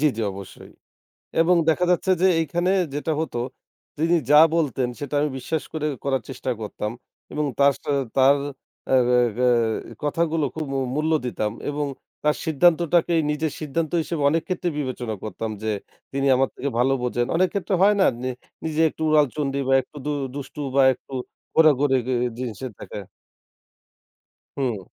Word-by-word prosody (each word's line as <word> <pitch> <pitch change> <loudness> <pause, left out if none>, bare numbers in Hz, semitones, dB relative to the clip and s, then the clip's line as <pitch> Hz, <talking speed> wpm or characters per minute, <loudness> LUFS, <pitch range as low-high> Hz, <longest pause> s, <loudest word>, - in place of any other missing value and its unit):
জি, 150 - +4
জি। - - -3
অবশ্যই। 100 -1 -11 0.7
এবং 175 +2 +4
দেখা 180 +3 +3
যাচ্ছে 180 +2 +2
যে, - - +6
এইখানে 175 +3 0 0.2
যেটা 155 +2 -1
হতো 140 -6 -3 0.6
তিনি 165 +2 +2 0.2
যা 150 - +8 0.2
বলতেন 135 -6 0
সেটা 145 0 -5
আমি 150 - +1
বিশ্বাস 155 +4 -3
করে 155 -1 -2 0.2
করার 135 -3 0
চেষ্টা 130 0 -4
করতাম। 105 0 -4 0.4
এবং 150 0 -1
তার 140 0 +6
সাথে 145 - -3 0.2
তার 135 +1 +6 0.6
আগা 125 -1 +4 0.2
গায় 120 -3 +1
কথাগুলো 160 +1 0
খুব 155 -2 -4
মূ - - 0 0.2
মূল্য 155 +1 +1
দিতাম 110 -3 -2 0.2
এবং 145 0 -2 0.4
তার 150 0 +3
সিদ্ধান্তটাকেই 170 +1 +3
নিজের 150 0 -1
সিদ্ধান্ত 155 +2 -2
হিসেবে 155 -2 -3
অনেক 165 +1 +1
ক্ষেত্রে 180 -1 -1
বিবেচনা 125 -5 -3
করতাম 110 +1 -4
যে 110 - -1 0.4
তিনি 140 0 0
আমার 135 +1 +2
থেকে 140 - -3
ভালো 130 +2 +3
বোঝেন। 120 -1 0
অনেক 185 +2 +3
ক্ষেত্রে 200 -1 -1
হয় 205 +1 +6
না - - +6 0.2
নি 130 - -1 0.4
নিজে 160 0 -1
একটু 160 - -8
উড়াল 150 -1 +5
চণ্ডী 140 -2 -1
বা 135 - +4
একটু 150 - -19
দু - - 0 0.2
দুষ্টু 145 +1 -7 0.2
বা 135 - +6
একটু 135 - -20 0.4
ঘোরাঘুরি 145 -4 +5
গে 130 - 0 0.2
জিনিসের 125 0 -5
থাকা। - - -7 1.6
হুম। 120 -7 -1
145 Hz, 160 wpm, -23 LUFS, 130-160 Hz, 1.6 s, যা